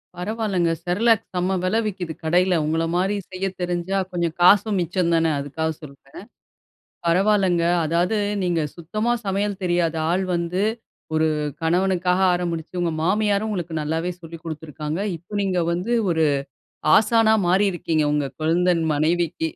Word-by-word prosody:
பரவால்லங்க, 190 -3 -1
செர்லாக் 220 +5 +2
செம்ம 180 +1 0
வில 185 +4 +1
விக்குது 180 -5 -4
கடையில. 180 +2 +2
உங்கள 160 +2 0
மாதிரி 190 +3 +1 0.2
செய்ய 185 +1 -3 0.2
தெரிஞ்சா 175 +2 -1
கொஞ்சம் 170 -2 -2
காசும் 200 +3 +5
மிச்சம் 175 0 0
தானே 165 -1 +2
அதுக்காக 155 +3 -3
சொல்றேன். 140 +1 -12 0.9
பரவாலங்க, 185 -1 +3 0.2
அதாவது 175 +6 +1 0.3
நீங்க 175 -2 0 0.2
சுத்தமா 215 +8 -2
சமையல் 200 0 -1
தெரியாத 175 -2 +1
ஆள் 185 +2 +1
வந்து 170 +3 -1 0.5
ஒரு 160 0 +3 0.3
கணவனுக்காக 180 +2 +1
ஆரம்பிச்சு 170 -1 -3
உங்க 170 -1 0
மாமியாரும் 205 +3 +1
உங்களுக்கு 175 -5 -4
நல்லாவே 160 +4 -2
சொல்லிக் 165 0 -10
குடுத்திருக்காங்க. 155 0 -5 0.2
இப்ப 180 +6 -8
நீங்க 190 -2 0
வந்து 180 +8 -2 0.2
ஒரு 160 -1 +2 0.7
ஆசானா 220 0 +4
மாறிருக்கிங்க 175 -4 +1
உங்க 145 -2 0
கொழுந்தன் 170 +2 +2
மனைவிக்கு. 160 +2 0
175 Hz, 130 wpm, -22 LUFS, 165-195 Hz, 0.9 s, காசும்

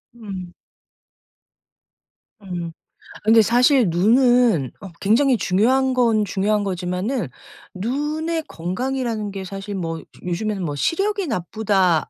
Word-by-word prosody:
음. 190 -6 -8 1.9
음. 175 -3 -5 0.5
아 - - -20
근데 225 +1 +6
사실 245 - +4
눈은 225 - +3
어 195 - -8
굉장히 245 +5 +3
중요한 250 +8 +2
건 230 -4 +2
중요한 205 +2 0
거지만은 185 - -2 0.5
눈의 300 - -2
건강이라는 225 +4 -3
게 195 -1 -6
사실 195 +2 -6
뭐 165 -3 -3
좀 - - -13
요즘에는 195 +2 -2
뭐 145 -2 -3
시력이 395 - 0
나쁘다 190 - +1
210 Hz, 235 characters per minute, -21 LUFS, 185-250 Hz, 1.9 s, 근데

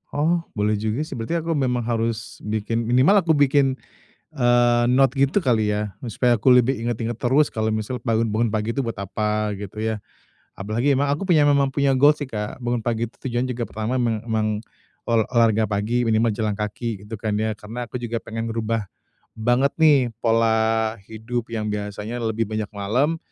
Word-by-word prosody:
Oh, 160 +4 +2 0.2
boleh 105 0 +1
juga 110 +7 -1
sih. 140 -5 -7
Berarti 115 +9 -2
aku 165 - -2
memang 125 -5 0
harus 115 -1 -2
bikin 110 +2 -2
minimal 130 +12 +5
aku 165 -4 +2
bikin, 140 -2 +3 0.6
eee, 120 -2 +3
note 130 +2 +3
gitu 140 +8 +2
kali 110 - +1
ya, 105 -2 -3 0.2
supaya 120 -2 +2
aku 120 +4 +4
lebih 125 +2 +4
inget-inget 115 0 -3
terus 135 +5 +2
kalau 110 0 -1
misalnya 110 +4 -4
bangun 115 -1 +1
bangun 110 +2 0
pagi 110 +2 -2
itu 135 - 0
buat 115 -4 -4
apa, 105 +1 -1
gitu 105 +1 -7
ya. 110 0 -1 0.6
Apalagi 115 +8 0
emang 140 +1 +1
aku 150 +7 -1
punya 165 -5 +4
memang 140 -2 +3
punya 140 -1 +2
goal 145 +3 +6
sih, 145 -1 -6
Kak, 105 +3 -5
bangun 120 -1 -1
pagi 115 -1 -1
itu - - -31
tujuannya 125 0 -2
juga 120 -1 -3
pertama 110 +4 -3
meng 115 -3 0
emang 110 -2 0 0.6
ol 115 -2 +3
olahraga 110 -2 +3
pagi, 110 +4 0
minimal 115 +1 +2
jalan 105 0 -1
kaki 105 0 -4
gitu 105 +1 -7
kan 105 -1 -2
ya. 110 +1 0
Karena 120 +3 -6
aku 125 - -4
juga 120 -1 -4
pengen 115 +1 -5
ngerubah 115 -1 -2 0.5
banget 120 +5 +2
nih 155 -3 +6 0.2
pola 110 -1 +1
hidup 115 +2 -4
yang 105 -1 -2
biasanya 105 +3 -4
lebih 115 -1 -1
banyak 110 -1 -2
malam. 125 +11 0
115 Hz, 185 wpm, -23 LUFS, 110-130 Hz, 0.6 s, goal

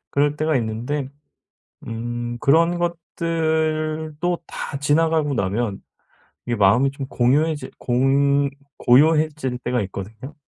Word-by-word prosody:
그럴 145 +1 +1
때가 155 0 +1
있는데 120 +5 -2 0.8
음 120 +1 -4
그런 165 +4 +3
것들도 160 -1 -1
다 140 - -5
지나가고 150 +1 +2
나면 100 0 -1 0.7
이게 120 -1 -1
마음이 110 +7 +4
좀 135 -1 -6
공유해질 145 +6 +1
공 140 +3 +2 0.3
고요해질 150 -1 +3
때가 125 0 -1
있거든요. 105 +8 -7
140 Hz, 235 characters per minute, -22 LUFS, 120-155 Hz, 0.8 s, 마음이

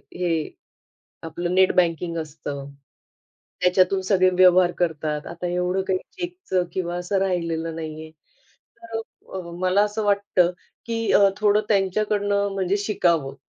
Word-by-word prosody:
हे 170 -3 -1 0.7
आपलं 175 +2 -3
net 190 0 +5
banking 170 -1 +1
असतं, 145 -3 -6 0.9
त्याच्यातून 185 +1 +3
सगळे 185 -1 +3
व्यवहार 180 -1 +5
करतात. 155 -3 -2
आता 170 +1 -5
एवढं 180 +2 0
काही 185 -1 +2
चेकच 350 - -3
किंवा 175 -2 -2
असं 180 +3 -1
राहिलेलं 165 -3 -1
नाहीये. 155 -1 -7 0.7
तर 230 -1 -6 0.3
अ, 190 - -3 0.2
मला 185 +2 +3
असं 210 +1 -2
वाटतं 200 -3 +2 0.3
की 230 -1 -1
अ, 200 -1 +6
थोडं 210 0 +3
त्यांच्याकडनं 200 0 +1
म्हणजे 195 +1 0
शिकावं 170 -9 0
185 Hz, 125 wpm, -23 LUFS, 170-200 Hz, 0.9 s, अ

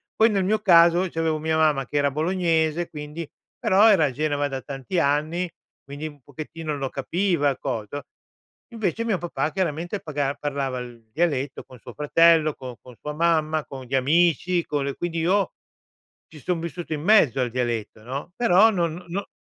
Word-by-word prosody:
Poi 220 +1 +5
nel 200 -3 +1
mio 215 +2 +2
caso 175 -2 +5
c’avevo 160 -2 -1
mia 160 0 0
mamma 150 -4 +2
che 145 - -2
era 145 -1 +2
bolognese, 165 +1 0
quindi, 150 +1 -7 0.3
però 205 +4 +5
era 190 -7 +5
a 140 - -1
Genova 145 +1 -1
da 135 -1 -5
tanti 140 +6 -3
anni, 155 +4 0 0.3
quindi 145 +3 -6
un 145 -2 -13
pochettino 155 +2 -6
lo 135 -1 -3
capiva 165 +2 0
il 135 - -2
cos 115 -6 -3
no? 145 0 -5 0.7
Invece 225 +1 -2
mio 215 -5 +1
papà 165 -2 -2
chiaramente 175 +1 -2
paga 145 -3 -2
parlava 135 -3 -3
il 120 -2 -10
dialetto 145 -4 -1
con 125 -3 -15
suo 125 +1 -11
fratello, 155 +2 +4
con 125 -2 -8
con 125 -2 -14
sua 150 - -5
mamma, 155 -1 +1
con 135 -2 -9
gli 135 +2 -2
amici, 170 +5 +2
con 145 -2 -1
le 140 -1 -3
quindi 170 -1 -3
io 190 +4 +1 0.8
ci 155 - -13
son 175 +1 -2
vissuto 170 0 -6
in 150 - -4
mezzo 160 - +4
al 125 - 0
dialetto, 115 -3 -3
no, 140 +7 -6
però 225 -1 +5
non 170 -3 -2
no 195 +4 -4
155 Hz, 180 wpm, -24 LUFS, 140-175 Hz, 0.8 s, Poi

